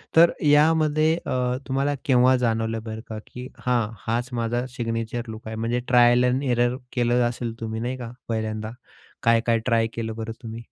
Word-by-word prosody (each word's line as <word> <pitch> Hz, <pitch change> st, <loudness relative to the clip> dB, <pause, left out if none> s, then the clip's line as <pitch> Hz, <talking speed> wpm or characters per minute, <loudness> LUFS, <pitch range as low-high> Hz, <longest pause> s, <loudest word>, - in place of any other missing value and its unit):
तर 170 Hz, +1 st, +7 dB
यामध्ये 155 Hz, +1 st, +4 dB
अ, 125 Hz, 0 st, 0 dB
तुम्हाला 140 Hz, +2 st, 0 dB
केव्हा 130 Hz, -1 st, +5 dB
जाणवलं 115 Hz, -2 st, 0 dB
बरं 110 Hz, -1 st, -6 dB
का 110 Hz, -, -5 dB
की 125 Hz, +1 st, -8 dB, 0.2 s
हां, 120 Hz, -4 st, +2 dB, 0.2 s
हाच 120 Hz, +3 st, -1 dB
माझा 120 Hz, +1 st, -1 dB
सिग्नेचर 115 Hz, 0 st, -3 dB
लुक 110 Hz, 0 st, -8 dB
आहे. 110 Hz, -, -5 dB
म्हणजे 115 Hz, +2 st, -1 dB
ट्रायल 120 Hz, 0 st, +5 dB
अँड 125 Hz, +3 st, +1 dB
एरर 120 Hz, -1 st, +2 dB, 0.2 s
केलं 120 Hz, 0 st, +2 dB
असेल 120 Hz, -1 st, -4 dB
तुम्ही 110 Hz, 0 st, -4 dB
नाही 125 Hz, +2 st, -3 dB
का, 120 Hz, -2 st, -7 dB, 0.2 s
पहिल्यांदा 110 Hz, -1 st, -2 dB, 0.5 s
काय 115 Hz, 0 st, +5 dB
काय 115 Hz, -1 st, +3 dB
ट्राय 115 Hz, -2 st, +2 dB
केलं 110 Hz, -1 st, -4 dB
बरं 115 Hz, 0 st, -5 dB
तुम्ही? 115 Hz, 0 st, -6 dB
120 Hz, 175 wpm, -24 LUFS, 115-125 Hz, 0.5 s, तर